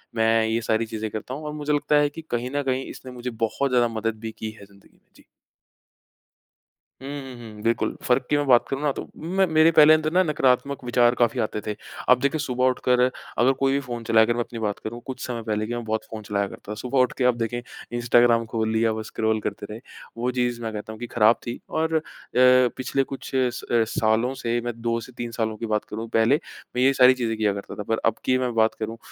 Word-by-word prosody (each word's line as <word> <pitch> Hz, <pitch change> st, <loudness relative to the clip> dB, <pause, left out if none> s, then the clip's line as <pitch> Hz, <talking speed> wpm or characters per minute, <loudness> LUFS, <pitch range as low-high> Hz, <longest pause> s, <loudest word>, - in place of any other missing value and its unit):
मैं 115 Hz, 0 st, +3 dB
ये 115 Hz, +1 st, 0 dB
सारी 110 Hz, 0 st, 0 dB
चीज़ें 110 Hz, 0 st, -4 dB
करता 110 Hz, +4 st, -5 dB
हूँ 150 Hz, +4 st, -6 dB
और 150 Hz, -, -4 dB
मुझे 150 Hz, 0 st, -2 dB
लगता 145 Hz, 0 st, +1 dB
है 145 Hz, 0 st, +4 dB
कि 165 Hz, +3 st, -9 dB
कहीं 120 Hz, +1 st, -2 dB
न 145 Hz, -, 0 dB
कहीं 130 Hz, 0 st, -1 dB
इसने 130 Hz, -, -9 dB
मुझे 125 Hz, 0 st, -5 dB, 0.2 s
बहुत 135 Hz, +5 st, -1 dB
ज़्यादा 120 Hz, -1 st, +4 dB
मदद 115 Hz, -1 st, -2 dB
भी 110 Hz, 0 st, -5 dB
की 110 Hz, -, -4 dB
है 100 Hz, -, -12 dB
ज़िंदगी 100 Hz, 0 st, -22 dB
में। -, -, -35 dB
जी। -, -, -20 dB, 1.8 s
उ, -, -, -9 dB
हुँ, 135 Hz, -2 st, -6 dB, 0.2 s
हुँ, 105 Hz, -, -11 dB
बिल्कुल। 115 Hz, 0 st, 0 dB
फ़र्क़ 125 Hz, +1 st, +2 dB
की 150 Hz, -, +3 dB
मैं 145 Hz, -, 0 dB
बात 120 Hz, -2 st, +5 dB
करूँ 135 Hz, +1 st, -3 dB
ना, 150 Hz, -2 st, +1 dB
तो -, -, -6 dB
मैं 185 Hz, +4 st, +1 dB
मेरे 160 Hz, +1 st, +5 dB
पहले 155 Hz, -1 st, +8 dB
अंदर 155 Hz, 0 st, +1 dB
ना 185 Hz, -, +5 dB
नकारात्मक 140 Hz, -3 st, +1 dB
विचार 120 Hz, 0 st, +3 dB
काफ़ी 120 Hz, +1 st, +1 dB
आते 110 Hz, -1 st, -2 dB
थे। 105 Hz, 0 st, -4 dB, 0.3 s
अब 125 Hz, 0 st, +6 dB
देखिए, 140 Hz, +3 st, 0 dB
सुबह 130 Hz, -3 st, 0 dB
उठकर 125 Hz, 0 st, +1 dB, 0.4 s
अगर 125 Hz, +3 st, +4 dB
कोई 135 Hz, 0 st, +2 dB
भी 140 Hz, -, +2 dB
फ़ोन 120 Hz, -1 st, -5 dB
चलाकर 115 Hz, +1 st, +4 dB
मैं 120 Hz, -, -3 dB
अपनी 115 Hz, 0 st, -8 dB
बात 105 Hz, -2 st, -2 dB
करूँ, 120 Hz, +2 st, -5 dB
कुछ 130 Hz, -1 st, -6 dB
समय 120 Hz, -2 st, -4 dB
पहले 110 Hz, 0 st, -1 dB
कि 120 Hz, -, -4 dB
मैं 120 Hz, -, -4 dB
बहुत 110 Hz, 0 st, -2 dB
फ़ोन 110 Hz, -1 st, -6 dB
चलाया 100 Hz, -1 st, -1 dB
करता। 105 Hz, -, -9 dB
सुबह 130 Hz, +1 st, 0 dB
उठके 130 Hz, 0 st, +1 dB
आप 125 Hz, -1 st, +4 dB
देखें, 120 Hz, +1 st, -2 dB, 0.4 s
इंस्टाग्राम 120 Hz, -1 st, +4 dB
खोल 110 Hz, -1 st, 0 dB
लिया, 110 Hz, 0 st, +2 dB
बस 110 Hz, 0 st, -5 dB
स्क्रॉल 110 Hz, 0 st, 0 dB
करते 105 Hz, 0 st, -4 dB
रहे। 110 Hz, -, -7 dB, 0.4 s
वो 125 Hz, +2 st, -1 dB
चीज़ 120 Hz, -1 st, -1 dB
मैं 115 Hz, -1 st, -3 dB
कहता 105 Hz, +1 st, -6 dB
हूँ 110 Hz, -, -12 dB
कि 120 Hz, -, -5 dB
ख़राब 115 Hz, 0 st, +6 dB
थी। 120 Hz, -, -4 dB
और 160 Hz, 0 st, 0 dB
अ, 160 Hz, -, +3 dB, 0.4 s
पिछले 130 Hz, +1 st, +4 dB
कुछ 135 Hz, 0 st, -8 dB
स 130 Hz, -2 st, 0 dB, 0.4 s
सालों 115 Hz, +4 st, +2 dB
से 120 Hz, -2 st, -1 dB
मैं 120 Hz, 0 st, -3 dB
2 115 Hz, 0 st, 0 dB
से 130 Hz, -, -11 dB
3 120 Hz, -1 st, -4 dB
सालों 110 Hz, -2 st, -2 dB
की 115 Hz, -, -4 dB
बात 105 Hz, -1 st, 0 dB
करूँ, 110 Hz, +2 st, -6 dB
पहले 115 Hz, +4 st, +3 dB, 0.4 s
मैं 125 Hz, -, +1 dB
ये 135 Hz, -, +6 dB
सारी 130 Hz, -1 st, +7 dB
चीज़ें 115 Hz, -3 st, -2 dB
किया 105 Hz, -2 st, +1 dB
करता 100 Hz, 0 st, -7 dB
था, 105 Hz, -, -5 dB
पर 115 Hz, +2 st, -1 dB
अब 115 Hz, -, +3 dB
की 130 Hz, -, +3 dB
मैं 125 Hz, -1 st, -1 dB
बात 110 Hz, 0 st, +3 dB
करूँ, 110 Hz, +1 st, -4 dB
120 Hz, 240 wpm, -24 LUFS, 110-130 Hz, 1.8 s, पहले